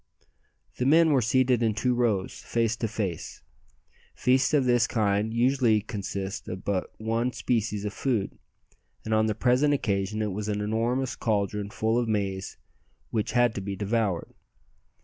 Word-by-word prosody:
The 125 - 0
men 160 +2 +5
were 135 -3 +4
seated 125 +1 +2
in 110 -2 +1
two 125 +3 +1
rows, 115 -6 0
face 115 -1 0
to 115 - -1
face. 100 -6 -4 0.7
Feasts 130 +1 +2
of 145 -4 +3
this 120 -2 +3
kind 105 -1 0
usually 120 -2 +3
consist 100 -2 -5
of 95 +1 -6
but 95 -3 -1
one 115 +3 -1
species 105 -3 -1
of 105 - -3
food, 115 -6 -2 0.7
and 110 - -1
on 110 0 +3
the 110 - -1
present 130 +6 +3
occasion 105 -2 -1
it 105 - -2
was 105 +2 -4
an 105 -1 -1
enormous 115 +5 -1
caldron 105 -2 -1
full 110 +3 0
of 120 - -1
maize 100 -3 -2 0.5
which 110 -1 -1
had 120 -1 +3
to 100 - -4
be 100 0 -4
devoured. 105 -3 -1
110 Hz, 160 wpm, -27 LUFS, 100-120 Hz, 0.7 s, men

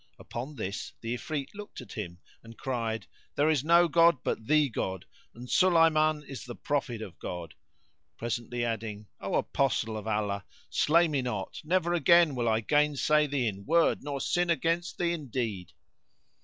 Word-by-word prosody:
Upon 130 +6 -7
this 100 -4 -5
the 115 +1 -3
Ifrit 140 +2 -4
looked 205 0 -9
at - - -10
him 85 -5 -6 0.2
and 115 0 -13
cried, 115 -4 -2 0.3
"There 150 +2 +3
is 145 -4 +1
no 170 +2 +5
god 165 0 +5
but 110 - -2
the 150 -1 +4
God, 95 -6 -3 0.3
and 120 +2 -9
Sulayman 155 -3 +4
is 135 -4 -8
the 120 -2 -8
prophet 125 -6 -2
of 95 -6 -10
God;" 85 -3 -6 0.6
presently 120 +1 -2
adding, 110 -2 -4
"O - - -2
Apostle 115 -5 0
of 110 0 -6
Allah, 105 -2 -1 0.3
slay 170 +3 +4
me 145 -4 0
not; 105 -6 -4
never 175 +1 +1
again 170 -1 +5
will 120 -3 0
I 110 0 +2
gainsay 150 +3 +3
thee 140 -3 0
in 100 -3 -3
word 165 +1 +3
nor 140 -1 -4
sin 175 +5 0
against 170 +2 0
thee 170 -1 +1
in 155 -5 -5
deed." 110 -9 -3
135 Hz, 170 wpm, -29 LUFS, 110-155 Hz, 0.6 s, no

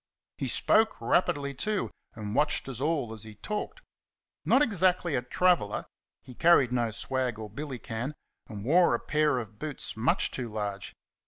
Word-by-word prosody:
He - - -1
spoke 220 0 +3
rapidly, 140 -5 +1
too, 210 +9 -1 0.2
and 105 -2 -5
watched 150 +2 +1
us 130 -2 -4
all 145 -7 0
as 110 - -8
he 110 0 -9
talked. 210 - -5 0.6
Not 280 - +5
exactly 185 - +2
a 125 - +1
"traveller;" 145 - +1 0.4
he 130 - -11
carried 140 -3 +5
no 120 -2 +1
swag 125 +2 -1
or 110 -2 -7
billycan, 130 0 -5 0.3
and 105 -5 -7
wore 175 +6 +5
a - - -2
pair 150 -3 +1
of 110 -3 -6
boots 150 -2 -4
much 110 +3 +1
too 125 -3 -4
large. 105 -2 -4
130 Hz, 160 wpm, -29 LUFS, 110-165 Hz, 0.6 s, Not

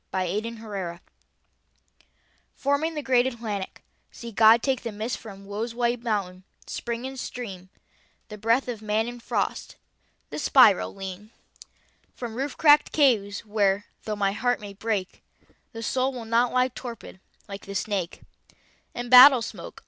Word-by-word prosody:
THE 190 - -3
ATLANTIC 200 -2 -5 1.5
Forming 285 +4 0
the 300 - -4
great 255 -1 +3
Atlantic, 220 -6 -5 0.3
see 235 -1 -9
God 225 +2 +6
take 265 -2 0
The 230 - -5
mist 215 +3 -4
from 200 -3 -11
woe's 220 +4 -5
white 240 0 0
mountain, 195 -6 -3 0.2
spring 235 +1 -5
and 265 0 -6
stream, 195 -8 -7 0.6
The 210 - -8
breath 230 +5 +2
of 235 -4 -5
man 215 +1 0
in 240 0 -7
frost, - - -3 0.6
the - - -4
spiral 250 -12 +5
lean 195 +2 -8 0.9
From 240 -3 -6
roof 270 +4 -4
cracked 295 -1 +5
caves 225 -9 +2
where, 205 -1 +1 0.2
though 215 - -2
the 200 -1 0
heart 245 +4 0
may 205 -1 -9
break, 200 -2 -3 0.5
The 225 0 -7
soul 260 +3 0
will 245 -3 -7
not 230 +2 +2
lie 255 0 +2
torpid, 235 -6 -9 0.3
like 200 -1 -9
the 200 - -7
snake, 190 -4 -3 0.7
And 240 0 -5
battle 255 -1 +9
smoke. - - -8
225 Hz, 150 wpm, -25 LUFS, 200-245 Hz, 1.5 s, battle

